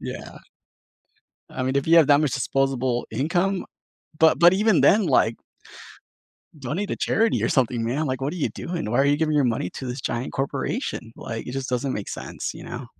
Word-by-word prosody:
Yeah. - - -8 1.1
I 130 - -4
mean, 130 +1 0
if 140 - 0
you 165 +1 +5
have 165 -3 +7
that 145 0 +5
much 150 -5 0
disposable 130 -2 0
income, 175 - 0
uh - - -14 0.5
but 160 -2 +5
but 175 +1 +7
even 210 -1 +3
then, 210 0 +5
like 125 -6 +3 1.2
donate 155 +10 -3
to - - -3
charity 225 +1 +1
or - - +1
something, 120 -3 +1
man, 135 +7 -1
like, 130 -1 -2
what 135 +2 -2
are - - -6
you 160 - 0
doing? 170 -10 -5
Why 120 - +1
are 135 - +4
you 145 +1 +3
giving 155 -1 0
your 145 - +3
money 115 -7 -1
to 130 - -7
this 125 +2 -5
giant 120 +1 -3
corporation? 135 - -3
Like, 115 0 -6
it - - -5
just 135 0 -4
doesn't 130 +2 -1
make 105 - -5
sense, - - -5
you - - -10
know? - - -7
135 Hz, 210 wpm, -24 LUFS, 125-160 Hz, 1.2 s, have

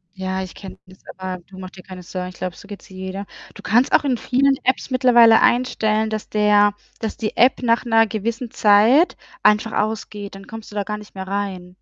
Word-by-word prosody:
Ja, 190 0 -3
ich 185 - -9
kenne 190 -2 -10
das, 185 +1 -17 0.2
aber, 185 -1 -6
du 190 -1 -14
mach 185 -1 -8
dir 185 -1 -14
keine 185 -1 -11
Sorgen. 180 +1 -6
Ich 185 - -11
glaube, 180 0 -5
so 200 - -15
geht's 205 -1 -11
jeder. 190 +1 -6 0.3
Du - - -12
kannst 240 +5 +2
auch - - +4
in 260 -4 0
vielen 270 +3 +2
Apps 260 +2 0
mittlerweile 240 -3 +5
einstellen, 220 -3 +1
dass 215 -1 -5
der 205 -1 +3 0.3
dass 220 -2 -4
die 215 -2 -4
App 255 +2 +4
nach 235 0 +1
'ner 225 -1 +4
gewissen 230 +3 -4
Zeit 220 - +4 0.3
einfach 210 +1 +3
ausgeht. 210 -2 -3
Dann 195 0 -12
kommst 225 -1 -10
du - - -13
da 205 - -1
gar 210 +1 -4
nicht 210 - -14
mehr 190 -1 -7
rein. 195 -2 -4
210 Hz, 215 wpm, -20 LUFS, 190-230 Hz, 0.3 s, mittlerweile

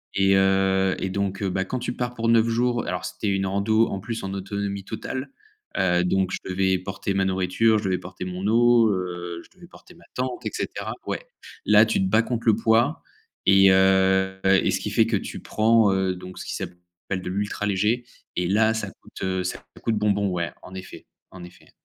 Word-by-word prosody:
et 95 0 +4
heu 95 0 +3
et 95 - -2
donc, 100 0 -2
heu 95 - 0
bah, 95 +1 -1
quand 130 - -3
tu 120 0 -3
pars 125 0 -4
pour 115 0 -2
9 115 0 +4
jours 120 0 0
alors 90 - -3
c'était 105 - -4
une 95 0 0
rando 105 +4 +2
en 95 - -4
plus 115 +2 -5
en 95 0 -4
autonomie 100 0 -4
totale, 130 +5 -5 0.5
heu, 90 -1 +2
donc 95 +1 +1
je - - -3
devais 95 0 +1
porter 95 +1 -4
ma 95 0 +1
nourriture, 95 +4 +2
je 105 - -3
devais 95 -1 0
porter 95 0 -8
mon 90 +2 -4
eau, 120 +1 +5
heu, 90 -2 -4
je - - -25
devais 175 -2 -15
porter 180 - -17
ma 170 - -19
tente 125 -1 -3
et - - 0
cetera. - - -4
Ouais, - - -4 0.4
là, 105 +1 +6
tu 110 - 0
te 95 - +1
bats 110 +3 +4
contre 115 -1 -4
le 110 - +6
poids 115 +6 +2 0.4
et 95 0 +6
heu 95 0 +3
et 95 0 +3
ce - - 0
qui - - -4
fait - - +3
que - - 0
tu - - -4
prends, 110 -2 +3
heu, 95 -1 0
donc 90 0 -10
ce - - -7
qui - - -4
s'appelle 90 +1 -7
de 90 - -5
l'ultra 105 +2 -2
léger 105 +5 +1 0.3
et 90 - 0
là, 110 +4 +3
ça 115 - -3
coûte, - - -15
heu, 95 -1 -1
ça 90 - -5 0.2
coûte 115 - +1
bonbon, 100 -1 +1
ouais, 85 -4 -2
en 95 - -12
effet, 95 0 -9 0.2
en 90 -2 -11
effet. 90 +1 -15
95 Hz, 215 wpm, -24 LUFS, 95-110 Hz, 0.5 s, là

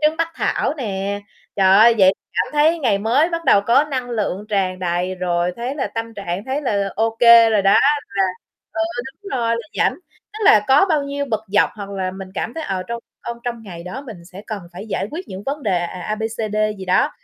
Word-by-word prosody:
trứng 310 +1 +3
bắc 330 0 0
thảo - - 0
nè. 200 -6 -3 0.4
Trời 190 0 +5
ơi, 230 +2 +7
vậy 190 -1 +6 0.2
cảm - - -1
thấy 305 +3 +3
ngày 230 -10 +1
mới 240 +10 +2
bắt 335 -1 -3
đầu 200 - +5
có 240 +8 +3
năng 260 -4 -4
lượng 210 -3 -2
tràn 190 -3 0
đầy 180 +1 -1
rồi, 175 -1 -1
thấy 245 +3 -3
là 285 - -2
tâm 225 0 -4
trạng 195 -1 -4
thấy 265 +3 -2
là 200 -7 0
ô 225 +1 0
kê 235 -1 +8
rồi 210 -3 +2
đó, 195 - +4 0.4
là 195 -1 +1 0.5
ừ, 325 - -1 0.4
đúng 400 - -9
rồi, 230 -1 0
là 235 +6 -7
rảnh, - - +3 0.4
tức 430 - -8
là 215 - +7
có 280 +8 +6
bao 310 -4 +2
nhiêu 280 0 -3
bực 220 -2 0
dọc 205 +1 +3
hoặc 200 -1 -8
là 190 -2 -2
mình 190 0 -8
cảm 230 - -3
thấy, 325 - -4
ờ, 190 -6 -2
trong 235 0 -4 0.3
trong 235 0 -4
trong 235 -2 -4
ngày 175 -5 -9
đó 205 +10 -7
mình 190 -8 -10
sẽ 185 +3 -11
cần 215 -3 -4
phải 185 +5 -8
giải 200 - -2
quyết 345 +5 -7
những 190 +1 -7
vấn 285 +2 -3
đề, 195 -6 +1
à, 175 - -2
à, 180 - -8
A, 215 - -2
B, 220 - -7
C, 220 -1 -3
D - - -2 0.2
gì 190 - -6
đó, 185 0 +2
220 Hz, 245 wpm, -20 LUFS, 195-260 Hz, 0.5 s, kê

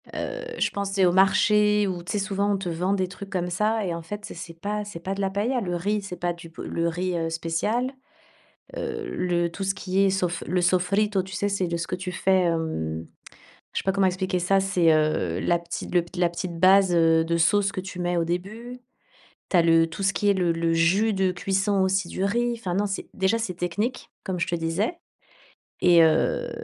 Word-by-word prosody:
Heu, - - -4 0.2
je - - +2
pense, 200 -1 -3
tu 195 - +1
es - - +6
au 175 - +4
marché 210 +2 +4
où, 180 -2 -3
tu 175 - -5
sais, 205 - 0
souvent 200 0 0
on 200 - +1
te 190 - -5
vend 180 +4 0
des 190 -2 0
trucs 195 +2 -10
comme 180 -2 -2
ça 210 +3 0
et 175 - -2
en 170 - -5
fait, 205 +5 -7
c'est - - -8
c'est 170 0 -9
pas 210 +2 -2
c'est 185 -5 -8
pas 190 +3 -3
de 200 - -4
la 195 - +1
paëlla. 225 +6 -1
Le 180 -4 -2
riz 205 +4 -1
c'est 195 -2 -7
pas 175 0 -1
du 170 -1 -12
b 165 - -26
le 170 0 -2
riz, 180 +2 -2
heu, 165 0 -1
spécial. 165 +10 -1 0.9
Heu, 445 -3 -4
le 175 -1 0
tout 195 +4 -5
ce 195 +1 0
qui 190 +1 -2
est - - +4
sof 180 -2 -1
le 180 +1 +1
sofrito, 190 +3 +2
tu 190 +1 -10
sais, 205 - -1
c'est 195 -2 -1
de 170 0 -2
ce 170 - -3
que - - -2
tu 180 0 -5
fais, 190 0 +2
hem, 160 - -2 0.7
je - - 0
sais - - -6
pas 190 - +3
comment 195 -1 +3
expliquer 185 0 -1
ça, 195 +3 +2
c'est, 180 -4 +3
heu, 155 - +1
la 170 0 +2
petite 170 +1 -6
le 175 - +4
la 175 -1 +3
petite 170 0 -5
base, 190 0 +5
heu, 165 -1 +4
de 170 0 0
sauce 195 +4 +3
que 185 - -3
tu 185 -1 -8
mets 175 0 0
au 170 - +2
début. 215 +8 -5 0.7
Tu - - +2
as - - +6
le 165 0 +4
tout 165 +4 -7
ce 195 - +2
qui 205 - +1
est - - +3
le 180 -3 +1
le 165 0 0
jus 190 +7 +3
de 190 -1 +1
cuisson, 195 +2 0
aussi, 190 -1 +1
du 190 - -3
riz. 240 +4 +1
Enfin 185 -6 -3
non 205 +2 +1
c'est 195 - -4
déjà 190 +4 +1
c'est 210 -5 -3
technique, 200 +8 -3
comme 185 -3 -3
je 170 - 0
te 175 - 0
disais 170 - -1 0.8
et 175 -2 +6
heu, 160 -1 +2
185 Hz, 240 wpm, -25 LUFS, 170-200 Hz, 0.9 s, es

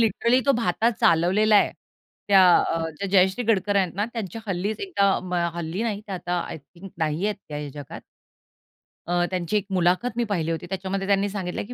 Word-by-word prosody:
Literally 235 +3 +2
तो 275 - +5
भाता 230 -1 +1
चालवलेला 195 +3 +3
आहे. - - +4 0.6
त्या 195 -2 +7
अ, 165 - 0 0.2
त्या 200 - -3
जयश्री 190 +4 +3
गडकर 205 -2 +1
आहेत 185 -4 +1
ना, 205 +3 0
त्यांच्या 225 -2 -5
हल्लीच 195 +3 -2
एकदा 200 - +1
अ, 180 -2 -1
हल्ली 170 +5 -3
नाही. 210 -3 -2
ते 195 - -6
आता 180 -1 -2
आय - - -6
थिंक 170 +6 -14
नाही 160 +3 -1
आहेत 210 - -1
त्या 150 - -5
या 150 -1 -5
जगात. - - -10 1.1
अ, 175 0 +1
त्यांची 180 +3 -1
एक 200 - -2
मुलाखत 185 +7 +1
मी 240 - +2
पहिली 170 -7 -1
होती. 165 +1 -4
त्याच्यामध्ये 195 +1 -3
त्यांनी 200 0 +2
सांगितलं 190 -3 -4
की 245 - -8
195 Hz, 195 wpm, -24 LUFS, 175-210 Hz, 1.1 s, त्या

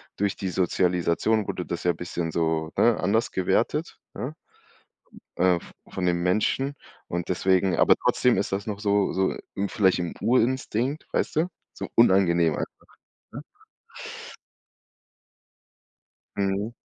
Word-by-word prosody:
durch 100 0 0
die 95 - -3
Sozialisation 90 +3 +1
wurde 90 - -3
das 85 - -4
ja 90 - +3
bisschen 85 0 -4
so, 80 -1 0
ne, 120 -1 +4
anders 110 +4 +1
gewertet, 110 - 0 0.2
ja? 135 +5 -4 1.0
Äh, 90 -2 +3
v - - -14 0.2
von 95 - -2
den 85 -1 +1
Menschen 110 +9 +1 0.3
und 85 +1 -4
deswegen 95 0 +2
aber - - +5
trotzdem 125 -5 +3
ist 100 - -1
das 95 +1 -2
noch 105 -2 -4
so 100 -1 +1
so, 95 0 +1 0.2
hm, 100 0 -1
vielleicht 95 -4 +2
'n 85 -1 -3
Urinstinkt, 130 +2 +1
weißt - - -1
du? 165 - +3 0.3
So - - -6
unangenehm 85 -7 +4
einfach, - - -5 0.6
ne? - - -8 2.9
Mhm. 100 +3 -1
95 Hz, 130 wpm, -25 LUFS, 90-110 Hz, 2.9 s, aber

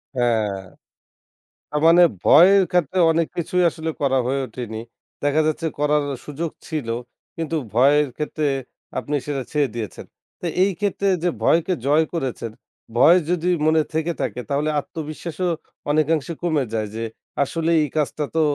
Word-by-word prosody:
হ্যাঁ। 110 -5 +1 1.1
না - - -6
মানে 175 +1 +7 0.2
ভয়ের 190 +6 +7
ক্ষেত্রে 180 0 +1
অনেক 165 0 +1
কিছুই 180 +2 +1
আসলে 160 0 -5
করা 135 -2 +2
হয়ে 135 +2 0
ওঠেনি। 110 -2 -6 0.4
দেখা 145 +2 +3
যাচ্ছে 160 +1 -1
করার 150 0 +2 0.2
সুযোগ 155 +2 -4 0.2
ছিল, 155 -8 -3 0.5
কিন্তু 165 0 -2 0.2
ভয়ের 145 +4 +4
ক্ষেত্রে 150 0 -1 0.5
আপনি 145 - -3
সেটা 140 -3 -2
ছেড়ে 145 -3 +1
দিয়েছেন। 110 -4 -6 0.3
তো - - -7 0.2
এই 195 - +2
ক্ষেত্রে 200 -1 0 0.2
যে 175 - +3
ভয়কে 170 +3 +3
জয় 155 +3 +4
করেছেন। 130 -8 -3 0.5
ভয় 170 +8 +7
যদি 180 0 +1 0.2
মনে 160 0 +4
থেকে 160 +2 0
থাকে - - -2
তাহলে 145 +2 0
আত্মবিশ্বাসও 160 +4 -4 0.4
অনেকাংশে 155 +1 +1
কমে 155 -5 +1
যায় 110 -1 -1
যে, 115 - -3 0.4
আসলে 165 +4 -1
এই 150 - 0
কাজটা 150 0 0
তো 160 - +3
155 Hz, 145 wpm, -22 LUFS, 140-165 Hz, 1.1 s, মানে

